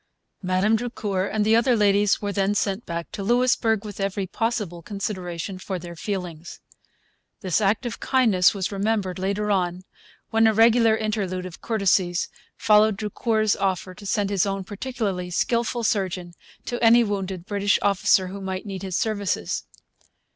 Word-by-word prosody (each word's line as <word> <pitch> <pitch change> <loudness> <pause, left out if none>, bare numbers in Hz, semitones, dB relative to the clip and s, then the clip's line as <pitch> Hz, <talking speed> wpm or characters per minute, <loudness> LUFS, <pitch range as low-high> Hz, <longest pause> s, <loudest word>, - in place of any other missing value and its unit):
Madame 185 +3 +2
Drucour 210 -5 -2
and 215 -1 0
the 220 +1 +4
other 240 +2 +3
ladies 205 -1 +3
were 205 -1 -3
then 200 0 0
sent 200 +2 -1
back 170 0 -5
to - - -6
Louisbourg 230 -1 +2
with 205 -1 -8
every 195 0 -1
possible 210 -4 -2
consideration 185 -1 -5
for 190 0 -4
their 170 0 -9
feelings. 175 -3 -5 0.8
This 185 0 0
act 210 +5 +1
of 235 - -4
kindness 220 -9 +3
was 195 -1 -3
remembered 200 -2 -1
later 200 +2 -1
on, 180 -2 0 0.5
when 225 0 +4
a 220 - +2
regular 225 0 +5
interlude 200 -4 -2
of 180 -3 -9
courtesies 190 -5 +1 0.3
followed 210 -1 +4
Drucour's 215 0 0
offer 190 -1 -2
to 200 - -13
send 205 -1 0
his 200 -1 +2
own 195 -1 -2
particularly 205 -3 -4
skilful 235 +6 0
surgeon 185 -5 -1 0.3
to 240 0 -3
any 235 +1 +7
wounded 195 -4 -3
British 200 0 +1
officer 190 -1 +3
who 200 +1 -7
might 190 0 -4
need 195 -2 -6
his 190 -2 -2
services. 200 - -1
200 Hz, 155 wpm, -24 LUFS, 185-220 Hz, 0.8 s, any